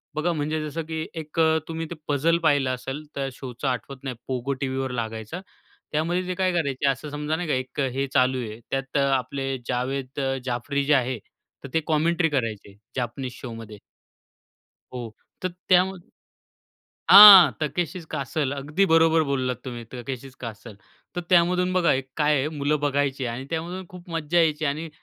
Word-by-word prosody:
बघा 160 +3 0
म्हणजे 155 0 -2
जसं 165 +3 -4
की 160 0 -4 0.2
एक 155 +2 -7
अ, 160 0 +4
तुम्ही 165 0 -4
ते 170 - -5
पझल 150 +4 +2
पाहिलं 145 -4 +3
असेल 135 +4 -6
तर 135 -1 -2
शोचं 130 +1 -6
आठवत 130 +1 -4
नाही 130 -3 -4 0.2
Pogo 130 +2 -2
TVवर 130 -1 -2
लागायचा. 115 - -5 0.5
त्यामध्ये 175 +4 0
ते 185 - -1
काय 185 0 +1
करायचे 140 -4 0
असं 135 +3 -3
समजा 150 +1 -2
नाही 175 +1 -4
का 150 - 0
एक 130 +2 -5
अ, 135 - +1
हे 135 +1 -1
चालू 130 -1 +3
आहे. 110 -1 -7
त्यात 135 +1 -2
अ, - - +3 0.2
आपले 135 +1 -3
जावेद 130 +2 -3
अ, 135 -1 0
जाफरी 130 +3 -1
जे 150 - +4
आहे. 130 -2 +1 0.5
तर 140 - -7
ते 160 - +3
कमेंट्री 165 +2 +2
करायचे 110 -7 -3 0.2
जापनीज 125 +1 -3
शोमध्ये. 115 -4 -8 1.2
हो, 120 -3 -5 0.3
तर 185 - 0 0.2
त्यामध्ये 185 -1 +2 1.0
हां. 195 -7 +12
Takeshi's 170 +3 -2
Castle. 140 -1 -1
अगदी 150 +8 0
बरोबर 165 -2 +4
बोललात 130 -3 -1
तुम्ही, 120 -2 -6
Takeshi's 130 +1 -7
Castle. 110 -1 -8 0.4
तर 175 - -2
त्यामधून 180 +1 +3
बघा 180 -2 +3
एक 135 - -11
काय 150 -1 +3
आहे 135 - 0
मुलं 145 +1 +1
बघायची 140 -2 0
आणि 120 +3 -4
त्यामधून 175 +3 -4
खूप 180 -1 -12
मज्जा 165 0 -1
यायची 155 -2 +2
आणि 155 +3 -2
140 Hz, 170 wpm, -25 LUFS, 130-165 Hz, 1.2 s, हां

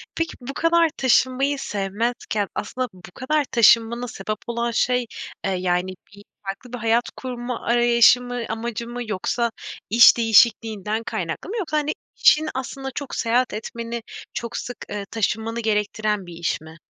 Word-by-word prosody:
Peki, 330 0 -1
bu 270 +3 -6
kadar 330 +1 +3
taşınmayı 260 +2 +2
sevmezken 205 0 -2
aslında 255 +4 -3
bu 180 0 -14
kadar 295 +3 0
taşınmana 235 +1 +4
sebep 215 0 -4
olan 235 0 -1
şey, 250 +1 +1 0.4
eee, 195 - +1
yani, 180 0 0 0.2
bir 200 0 -14 0.2
farklı 215 +6 -7
bir - - -3
hayat 230 +2 +2
kurma 245 -1 -5
arayışı 240 0 +5
mı, 245 -1 -4
amacı 230 +1 -4
mı 245 +1 -5
yoksa 230 +3 -1 0.4
iş 235 +2 +8
değişikliğinden 220 -1 +3
kaynaklı 175 - -4
mı? 460 - -3
Yoksa, 310 -7 -1
hani, 300 0 0 0.2
işin 310 +1 +5
aslında 270 +1 -4
çok 285 -3 -5
seyahat 245 +2 +1
etmeni, 230 +2 -5 0.3
çok 235 0 -4
sık, 245 - -5
eee, 205 -1 -4
taşınmanı 225 +1 -1
gerektiren 210 -2 0
bir 175 - -10
iş 165 -2 -2
mi? 160 +1 -13
235 Hz, 155 wpm, -23 LUFS, 210-250 Hz, 0.4 s, iş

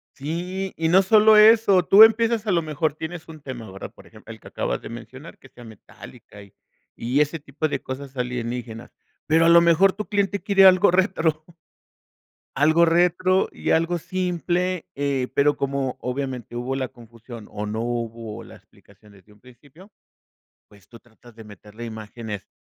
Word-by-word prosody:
Sí, 180 +6 -5
y 160 0 0
no 190 +3 +5
solo 215 +2 +5
eso, 215 -3 +6
tú 205 +6 +8
empiezas 225 0 +3
a 210 - 0
lo 170 -2 +2
mejor 155 -1 -2
tienes 160 +2 -8
un 155 -2 -12
tema, 120 -7 -9
¿verdad?, 95 - -9
por - - -19
ejemplo, - - -14
el - - -12
que - - -15
acabas - - -3
de - - -8
mencionar 120 +7 -11
que 135 - -18
sea 120 - -15
metálica 110 -1 -15
y 100 - -20 0.4
y 125 +5 0
ese 150 +2 -1
tipo 145 +2 -4
de - - -4
cosas 135 +1 -8
alienígenas, 120 -1 -5 0.3
pero 165 +2 +3
a - - +5
lo 170 0 +7
mejor 170 +3 +4
tu 210 +1 -6
cliente 200 -1 -1
quiere 195 -2 +4
algo 185 +1 +5
retro. 170 -4 0 1.1
Algo 160 +4 +4
retro 180 +3 +2
y - - -3
algo 165 +2 +1
simple, 180 0 -2
eh, 140 -2 -2
pero 145 +1 +2
como 135 -2 -3
obviamente 125 -2 -5
hubo 125 +2 -3
la 130 -1 -3
confusión 115 -1 -13
o 105 0 -6
no 110 +2 -4
hubo 115 -2 -5
las - - -15
explicaciones 100 -2 -22
desde 105 +3 -23
un 105 - -25
principio, 140 - -19 0.8
pues 100 -3 -22
tú 115 - -14
tratas 120 0 -20
de 110 -1 -13
meterle 105 +3 -12
imágenes 110 -2 -8
145 Hz, 175 wpm, -22 LUFS, 120-180 Hz, 1.1 s, tú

